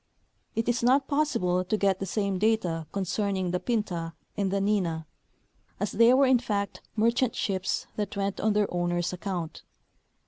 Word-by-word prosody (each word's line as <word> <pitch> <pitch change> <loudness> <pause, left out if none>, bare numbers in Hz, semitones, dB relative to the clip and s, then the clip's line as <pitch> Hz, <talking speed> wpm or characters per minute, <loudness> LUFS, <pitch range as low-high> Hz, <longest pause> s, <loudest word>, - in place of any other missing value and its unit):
It 225 +1 -1
is 240 0 +1
not 265 +3 +3
possible 185 -12 +1
to 200 +4 0
get 195 -2 +2
the 195 - -3
same 200 -1 -1
data 180 -7 +1
concerning 195 -1 -1
the 180 - 0
Pinta 180 -6 -2 0.2
and 200 -2 0
the 200 +1 0
Nina, 185 -6 0 0.7
as 205 +1 -1
they 230 +3 +6
were 270 +2 +5
in 260 -2 +5
fact 200 -4 -2
merchant 235 +2 +2
ships 190 -2 -1
that 205 -1 -3
went 195 0 -1
on 215 -1 +2
their 210 0 +3
OAvners' 175 -1 -1
account. 180 -3 -4
200 Hz, 165 wpm, -28 LUFS, 180-225 Hz, 0.7 s, they